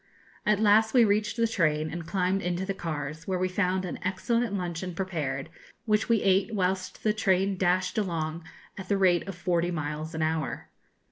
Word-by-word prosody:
At 210 -1 +4
last 220 +2 +4
we 240 -2 +7
reached 210 +2 +1
the 230 0 +3
train, 155 -7 +1
and 165 0 -6
climbed 190 +1 0
into 180 +1 -2
the 195 - -2
cars, 155 -3 -5
where 190 -1 0
we 185 +1 +1
found 185 0 0
an 175 - -5
excellent 225 +6 0
luncheon 180 -1 -4
prepared, 155 -8 -3 0.4
which 215 +1 +1
we 230 -2 +3
ate 195 +3 +2
whilst 185 -1 -1
the 215 - +3
train 195 -2 +2
dashed 185 +2 +1
along 165 -4 -2 0.4
at 190 - -8
the 200 - +2
rate 180 -3 +3
of 195 - -5
forty 175 -1 0
miles 155 -1 -4
an 160 - 0
hour. 160 0 -2
185 Hz, 185 wpm, -28 LUFS, 165-200 Hz, 0.4 s, we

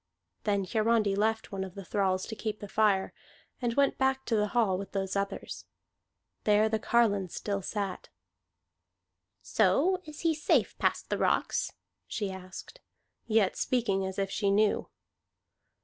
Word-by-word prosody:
Then 200 -2 +1
Hiarandi 215 0 +2
left 220 +2 0
one 195 -1 -3
of 190 -2 -8
the 195 -2 -8
thralls 190 -2 0
to 220 - -6
keep 215 -1 -4
the 205 - -7
fire, 200 -2 +2 0.5
and 235 -2 0
went 280 -1 +2
back 265 0 +1
to 230 - +1
the 210 -1 +2
hall 220 -4 +2
with 195 +1 -6
those 195 -1 -2
others. 200 0 -3 0.8
There 210 +1 +4
the 220 0 0
carline 205 -5 +2
still 200 +3 -3
sat. 200 -1 -4 1.3
"So 370 +6 +3
he 320 +1 -1
is 310 -1 -5
safe - - +2
past - - 0
the - - 0
rocks?" - - +1 0.3
she 205 -3 -3
asked, 190 - -9 0.5
yet 215 -4 +3
speaking 220 -6 0
as 190 0 -4
if 195 -1 -1
she 200 -2 0
knew. 205 +1 +2
210 Hz, 150 wpm, -30 LUFS, 195-230 Hz, 1.3 s, There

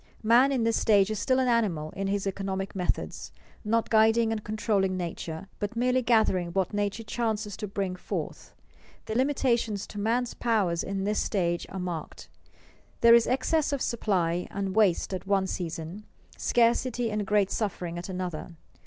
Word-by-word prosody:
Man 240 +5 +5
in 255 -4 +1
this 230 0 +2
stage 205 -1 +3
is 215 - -2
still 255 +5 +2
an 260 -1 +2
animal 190 -11 +1
in 195 0 -3
his 200 0 -1
economic 195 0 -3
methods, 180 -2 -3 0.3
not 225 +1 0
guiding 225 +1 +4
and 215 -2 -3
controlling 205 -3 0
nature, 170 0 -5
but 205 +3 -3
merely 250 +2 +2
gathering 220 -7 +2
what 190 +1 0
nature 205 +2 -1
chances 215 -3 -2
to 210 - -4
bring 195 -2 -3
forth. 180 - -6 0.5
The - - -4
limitations 240 -5 +1
to 205 - -8
man's 235 +4 0
powers 200 -8 0
in 195 0 -3
this 210 +1 0
stage 175 -4 -1
are 190 - -7
marked. 175 -3 -6 0.7
There 235 0 +8
is 235 -1 +6
excess 275 +5 +1
of 280 - -1
supply 180 -7 0
and 195 -1 -3
waste 200 -3 +2
at 185 +1 -5
one 195 -1 +2
season, 175 +2 -5 0.3
scarcity 240 0 +1
and 210 0 -1
great 200 -1 +2
suffering 175 -5 -3
at 180 - -7
another. 180 -2 -5
205 Hz, 165 wpm, -27 LUFS, 185-230 Hz, 0.7 s, There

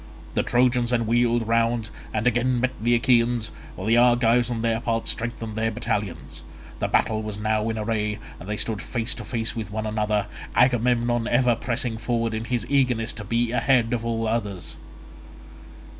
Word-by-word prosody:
The - - +2
Trojans 125 -1 +2
then 120 -2 +1
wheeled 120 0 +2
round, 115 -1 +1 0.2
and 110 +1 -2
again 125 +1 +2
met 130 +1 +1
the 120 +1 +3
Achaeans, 120 -1 +2 0.2
while 95 - -6
the 115 +2 +4
Argives 120 0 +4
on 115 -2 -3
their 115 -1 +1
part 115 -1 -1
strengthened 115 -1 -3
their 110 0 0
battalions. 105 -7 -3 0.4
The - - 0
battle 110 -1 +1
was 105 -1 -5
now 110 +1 0
in 110 - -2
array 105 -1 -1 0.2
and 90 - -9
they 105 - -2
stood 110 -2 -1
face 120 0 -1
to 120 - -8
face 115 +1 -2
with 110 -3 -4
one 110 +1 -3
another, 105 -1 0 0.3
Agamemnon 120 -1 +2
ever 120 -1 +3
pressing 120 -1 -1
forward 115 -1 -1
in 110 +1 -3
his 120 -2 -1
eagerness 125 -4 +1
to 105 - -7
be 115 +3 0
ahead 125 -2 +2
of 115 -1 -1
all 115 -1 -1
others. 105 -5 -3
115 Hz, 175 wpm, -24 LUFS, 110-120 Hz, 0.4 s, the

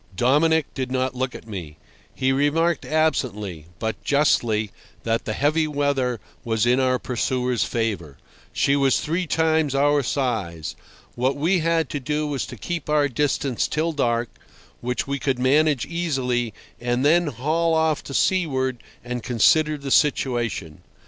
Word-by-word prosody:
Dominic 150 - +3
did 130 -1 -4
not 130 0 0
look 130 0 -3
at - - -10
me. 85 -8 -7 0.4
He 130 0 +1
remarked 155 +5 +1
absently, 105 - -1
but 110 0 -4
justly, 115 -8 +2 0.3
that 115 0 -1
the 110 - -2
heavy 155 +5 +1
weather 140 -5 0 0.2
was 110 -2 0
in 125 +2 +3
our 130 -1 +2
pursuer's 125 -2 -1
favour. 100 - -2 0.3
She 140 - +2
was 135 -2 +3
three 170 +3 -2
times 160 -3 +1
our 145 +1 +3
size. 110 - -2 0.4
What 130 +3 0
we 175 +6 +2
had 165 0 +1
to 145 - -2
do 150 +3 -1
was 145 -3 -2
to 125 - -9
keep 165 - -4
our 150 -1 +3
distance 140 -1 0
till 160 +2 0
dark, 120 -5 0 0.5
which 125 +1 -2
we 140 0 -3
could 135 -2 0
manage 140 +1 +3
easily, 130 -9 -1 0.3
and 120 +2 0
then 170 +3 +4
haul 155 +6 0
off 160 -2 +1
to 140 - -6
seaward 130 -9 +1 0.2
and 125 0 -4
consider 150 +7 +3
the 140 -1 -6
situation. 120 - +1
135 Hz, 150 wpm, -23 LUFS, 120-150 Hz, 0.5 s, then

